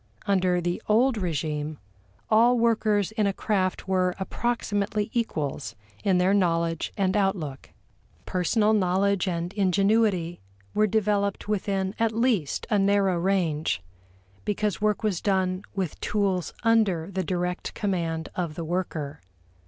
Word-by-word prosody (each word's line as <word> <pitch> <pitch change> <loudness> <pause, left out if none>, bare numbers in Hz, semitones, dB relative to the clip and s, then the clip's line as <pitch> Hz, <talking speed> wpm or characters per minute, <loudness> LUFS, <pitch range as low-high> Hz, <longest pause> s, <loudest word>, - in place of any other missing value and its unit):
Under 185 -2 +2
the 175 0 -2
old 240 +4 +4
regime 155 -5 -2 0.5
all 235 +3 +5
workers 220 -3 +2
in 215 -2 +1
a 200 - 0
craft 190 -3 -1
were 185 -1 +1
approximately 210 0 -1
equals 145 - -2 0.3
in 190 -2 +3
their 185 +2 +3
knowledge 165 -4 +1
and 190 -1 +1
outlook. 190 -9 -1 0.6
Personal 210 +4 +2
knowledge 195 0 +2
and 175 0 -2
ingenuity 195 - +2 0.3
were 215 0 +3
developed 205 -1 0
within 195 -2 -1
at 225 -1 +2
least 225 - 0
a 210 - +4
narrow 195 -2 +3
range, 170 - 0 0.6
because 210 -2 -1
work 210 0 +1
was 205 -6 0
done 185 -2 +1
with 185 -5 -3
tools 195 -4 0
under 200 -7 +2
the 190 0 -1
direct 180 0 -3
command 165 -5 -1
of 170 -4 -2
the 165 - -4
worker. 160 - -3
190 Hz, 130 wpm, -26 LUFS, 175-210 Hz, 0.6 s, all